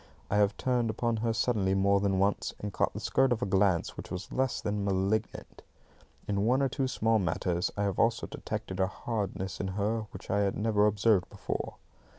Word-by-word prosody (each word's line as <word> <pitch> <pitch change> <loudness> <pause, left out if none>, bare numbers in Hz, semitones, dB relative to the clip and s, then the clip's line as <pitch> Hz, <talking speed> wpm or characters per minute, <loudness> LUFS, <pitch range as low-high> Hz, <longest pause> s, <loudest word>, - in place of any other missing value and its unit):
I 105 - +3
have 105 0 +3
turned 125 -3 +1
upon 115 +1 0
her 115 +1 0
suddenly 105 -5 +1
more 100 +1 +3
than 100 -1 +1
once, 100 +2 0
and 105 -1 -5
caught - - +1
the - - -5
skirt 135 -1 +2
of 120 0 +1
a - - +1
glance 95 -3 +2
which - - -7
was 90 +1 -6
little - - -6
less 130 -1 +1
than 105 0 -2
malignant. 100 +2 -1 0.7
In 100 -1 0
one 130 +5 +3
or 135 - +2
two 135 +1 -1
small 115 -3 +2
matters 90 -1 0
I 100 - +1
have 100 -2 -1
also 115 0 +2
detected 95 0 -5
a 95 - +3
hardness 95 -2 -4
in 95 - -2
her 110 +2 -1
which - - -8
I 100 - +2
had 100 -1 +1
never 105 -1 +3
observed 105 -2 +2
before. - - -4
105 Hz, 205 wpm, -30 LUFS, 95-115 Hz, 0.7 s, I